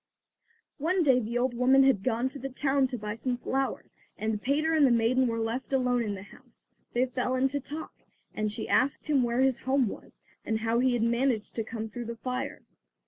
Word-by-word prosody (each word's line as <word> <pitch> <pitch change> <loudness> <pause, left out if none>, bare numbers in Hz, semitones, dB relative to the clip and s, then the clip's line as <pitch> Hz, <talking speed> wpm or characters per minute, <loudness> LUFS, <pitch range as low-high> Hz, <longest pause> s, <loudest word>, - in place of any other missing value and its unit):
One 350 +5 +1
day 265 -4 +5
the 235 +1 -2
old 250 0 +1
woman 260 +3 +5
had 265 -7 +3
gone 240 +2 0
to 280 +1 -8
the 270 - -4
town 270 0 +1
to 250 - -5
buy 210 -1 -4
some 245 +2 -2
flour, 265 +2 -2 0.3
and 215 -1 -2
Peter 300 +6 +1
and 310 -2 +4
the 270 - +6
maiden 240 +2 +3
were 230 -1 -1
left 230 +4 -3
alone 250 -2 +2
in 210 -3 -2
the 190 - -8
house. 245 +4 -19 0.2
They 245 +2 +3
fell 255 0 -1
into 270 +2 +1
talk, 300 +3 -7 0.4
and 215 -1 -1
she 220 +1 -5
asked 265 +2 +1
him 290 -4 +2
where 240 +1 +1
his 265 -2 +2
home 265 -1 +2
was, - - -9 0.2
and 220 0 -1
how 230 +1 +1
he 255 0 +3
had 240 -2 +1
managed 235 -1 0
to 225 - -2
come 225 0 -5
through 240 +2 -6
the 235 +1 -5
fire. 255 +4 -4
250 Hz, 215 wpm, -28 LUFS, 230-270 Hz, 0.4 s, the